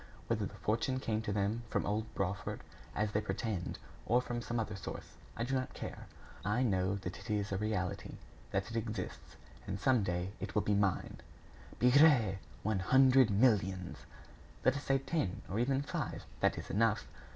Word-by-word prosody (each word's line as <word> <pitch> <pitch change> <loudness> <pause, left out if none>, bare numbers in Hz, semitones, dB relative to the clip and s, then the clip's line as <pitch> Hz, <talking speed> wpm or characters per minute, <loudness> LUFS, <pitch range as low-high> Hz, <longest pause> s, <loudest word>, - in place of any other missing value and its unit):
Whether - - 0
the - - -12
fortune 120 +4 0
came 110 -3 -1
to 110 - -3
them 105 +3 0
from - - 0
old 110 +2 -1
Brawford, 95 0 -2 0.3
as 105 0 0
they 105 - +1
pretend, 95 -2 -2 0.3
or 120 +2 +5
from 120 -1 -3
some 120 0 -2
other 105 -2 -2
source, 100 - -7 0.2
I 115 - 0
do 130 +3 -2
not 130 -1 -1
care. - - -6 0.4
I 105 +5 +1
know 95 -4 +2
that 95 -2 -5
it - - -11
is 105 -1 0
a 95 - 0
reality; 105 -4 -2 0.3
that 95 +3 -1
it - - -5
exists. 110 -1 -4 0.3
And - - -3
some 130 -4 +4
day 90 0 -1
it - - -5
will 105 - +3
be 105 - +2
mine." 100 -3 +1 0.6
"Bigre! 125 -6 +6 0.2
One 105 -1 +1
hundred 130 +4 +6
millions!" 100 -4 +2 0.7
"Let 130 - +5
us 140 - -3
say 135 - +3
ten, 135 - -2
or 100 +4 -2
even 135 +3 +2
five - - -4
that - - +2
is - - -6
enough! 110 0 +2
110 Hz, 180 wpm, -34 LUFS, 100-125 Hz, 0.7 s, Bigre